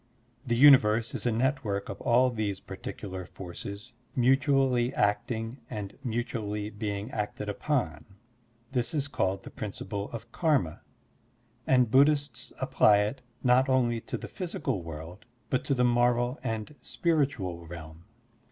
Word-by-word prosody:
The 120 - +2
universe 115 -4 +6
is - - -1
a - - +3
network 115 -4 0
of 100 - -7
all 125 +2 +4
these 105 -4 -2
particular 95 -2 -7
forces 100 +6 -8 0.2
mutually 130 -1 +3
acting 115 +4 0
and 105 -4 -5
mutually 110 -3 -3
being 105 +1 -4
acted 105 0 -3
upon, 100 - -1 0.7
This 125 +3 0
is 145 -1 0
called 95 -8 -1
the - - -10
principle 100 -1 -5
of 115 0 -8
karma, 145 - +1 0.9
and 125 -4 +4
Buddhists 140 -2 +3
apply 105 -1 +4
it 110 +6 -2 0.2
not 130 +1 +4
only 120 -3 +2
to - - -4
the - - -7
physical 150 - -3
world 85 +5 -9 0.3
but 130 - +1
to 140 - +1
the 125 -1 +3
moral 120 +2 +2
and 115 +2 -3
spiritual 120 - -1
realm. 80 0 -10
115 Hz, 135 wpm, -29 LUFS, 100-130 Hz, 0.9 s, universe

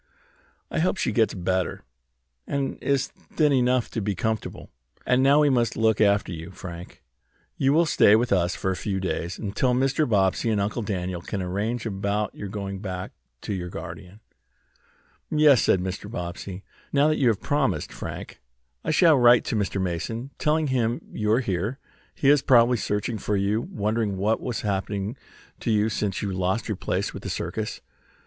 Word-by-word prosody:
I - - -1
hope 185 +3 +1
she - - 0
gets 110 -3 +2
better, 95 0 -1 0.6
and 140 -1 -2
is 140 -1 +1
thin 150 -2 -1
enough 125 -1 +2
to 115 - -2
be 100 -1 -1
comfortable. 110 +4 -3 0.3
And 125 +1 +3
now 140 +3 +5
we 145 -2 +4
must 120 -3 +1
look 110 -1 +2
after 100 -2 +3
you, 85 0 -7
Frank. 90 -2 -10 0.5
You 135 - +2
will 165 +4 +4
stay 105 -8 +5
with 120 +2 +1
us 90 -1 +1
a 95 - +2
few 95 0 -2
days, 90 -2 -3
until 120 +4 0
Mr. 135 +2 +1
Bobbsey 100 +1 +2
and 105 -2 +1
Uncle 105 +4 -1
Daniel 90 -4 -3
can 100 +3 -4
arrange 105 +6 -2
about 100 0 -1
your 100 - -6
going 100 -1 -5
back 95 -2 -5 0.3
to 105 - -4
your 90 -2 -4
guardian." 90 +5 -9 1.1
"Yes," 150 -4 +5
said 95 - +3
Mr. 95 +2 -5
Bobbsey. 90 -1 -6 0.3
"Now 145 +1 +4
that 155 - +1
you 130 - +3
have 110 -4 +2
promised, 145 -2 0
Frank, - - -7 0.4
I - - -3
shall 155 -2 +5
write 120 0 +6
to - - -2
Mr. 100 -2 -1
Mason, 115 +8 -3
telling 155 +1 +2
him 120 -2 0
you 105 0 0
are 115 +4 +4
here. 100 +3 -2 0.4
He 140 - +2
is 145 -1 +4
probably 125 -2 +5
searching 105 +2 -2
for 105 +1 -1
you, 100 +3 +1
wondering 110 - -1
what 105 +4 +1
has 120 -3 -3
happened 100 +1 -2 0.4
to - - -3
you 110 0 +3
since 105 -2 -2
you 100 - -1
lost 95 +4 -1
your 110 - -1
place - - -2
with - - -7
the - - -5
circus." - - -4
105 Hz, 180 wpm, -25 LUFS, 95-125 Hz, 1.1 s, write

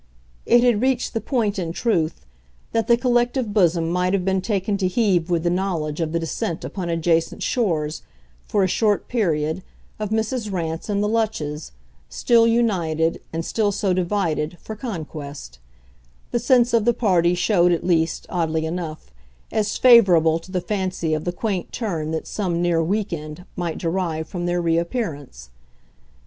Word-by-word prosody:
It 240 0 +5
had 240 -4 +3
reached 260 -1 0
the 225 - -1
point, 215 -7 0
in 170 -3 -2
truth, 170 -8 -1 0.5
that 225 -1 0
the 235 - +5
collective 240 -2 +1
bosom 170 -5 +3
might 180 +1 +1
have 190 -2 0
been 190 -1 +1
taken 200 -1 -1
to 190 -2 +1
heave 185 -4 +1
with 170 -2 +1
the 175 - +1
knowledge 170 -4 -2
of 160 -1 -1
the 170 - 0
descent 165 0 -3
upon 180 -3 -4
adjacent 165 0 0
shores, 160 -10 -1 0.5
for 205 - +2
a - - +3
short 210 +2 +1
period, 165 -7 0 0.4
of 210 -1 -2
Mrs. 220 0 -1
Rance 165 0 -3
and 205 0 +1
the - - +1
Lutches, 205 -10 -2 0.4
still 230 -1 +3
united, 175 -9 +1
and 165 0 -3
still 215 -2 +1
so 195 -1 0
divided, 175 -4 -1
for 220 - -7
conquest: 150 - -7 0.7
the 240 - +1
sense 245 0 +3
of 230 -2 +4
the 240 -1 +3
party 180 -5 +2
showed 180 -1 +3
at 170 - 0
least, 165 -2 +1
oddly 160 -2 -1
enough, 160 - -5 0.4
as 215 -2 0
favourable 180 -10 +6
to 175 +3 -14
the 180 -1 -1
fancy 185 -4 -2
of 155 0 -2
the 175 - 0
quaint 185 -1 -3
turn 170 -10 -3
that 160 0 -3
some 180 -5 -2
near 175 -1 +2
"week 200 +3 -1
end" 155 +2 -7
might 175 -3 -3
derive 165 -2 -2
from 175 -1 -4
their 175 0 0
reappearance. 165 - -2
180 Hz, 165 wpm, -22 LUFS, 165-215 Hz, 0.7 s, favourable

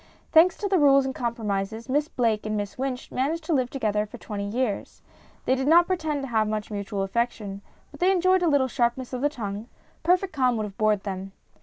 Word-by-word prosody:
Thanks 340 +2 +6
to 410 - -2
the 380 -2 +2
rules 275 -2 +5
and 265 - -2
compromises, 220 -2 -3
Miss 290 +3 +1
Blake 225 -7 0
and 215 0 -1
Miss 205 -1 -4
Wynch 255 -1 -4
managed 305 +6 -1
to 320 - -1
live 255 -4 +1
together 215 -5 -1
for - - -10
twenty 205 -2 -5
years. 225 -1 -3 0.4
They 255 - +3
did 265 +1 -1
not 340 +3 +7
pretend 315 -6 -1
to - - -4
have 220 -2 +2
much 215 0 -3
mutual 200 -1 -3
affection, 205 -1 -2 0.3
but - - -13
they 365 +2 +4
enjoyed 370 0 +3
a 350 - +2
little 280 -3 +3
sharpness 245 0 -1
of 250 - -3
the 290 - +3
tongue; 215 -5 -5 0.3
perfect 360 +2 +2
calm 255 -4 +2
would 215 - -1
have 200 -2 -9
bored 215 -2 +2
them. 195 -1 -5
245 Hz, 215 wpm, -25 LUFS, 210-290 Hz, 0.4 s, not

